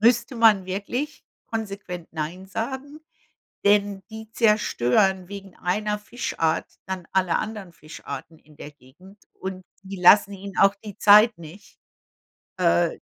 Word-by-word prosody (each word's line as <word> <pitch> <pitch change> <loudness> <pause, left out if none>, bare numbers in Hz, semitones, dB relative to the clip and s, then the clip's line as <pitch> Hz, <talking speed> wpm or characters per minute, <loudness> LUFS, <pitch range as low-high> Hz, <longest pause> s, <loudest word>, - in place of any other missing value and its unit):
müsste 240 +3 +3
man 220 -4 +5
wirklich 240 +11 -4 0.3
konsequent 200 -6 -5
nein 165 +4 -5
sagen, 265 +9 -5 0.7
denn 200 -1 +2
die 220 0 -10
zerstören 190 - +2
wegen 195 -2 -9
einer 210 +3 -1
Fischart 205 -7 -2 0.2
dann 190 -2 -5
alle 185 -2 +2
anderen 210 -5 -6
Fischarten 155 0 -9
in 150 0 -22
der 150 - -9
Gegend 150 +9 -19
und 190 0 -7 0.2
die 195 0 -8
lassen 200 +3 +6
ihn 200 0 -8
auch 195 0 +5
die 205 -3 -9
Zeit 210 +2 +6
nicht, 170 +5 -14 0.8
äh, 85 +1 +2
195 Hz, 130 wpm, -24 LUFS, 180-215 Hz, 0.8 s, lassen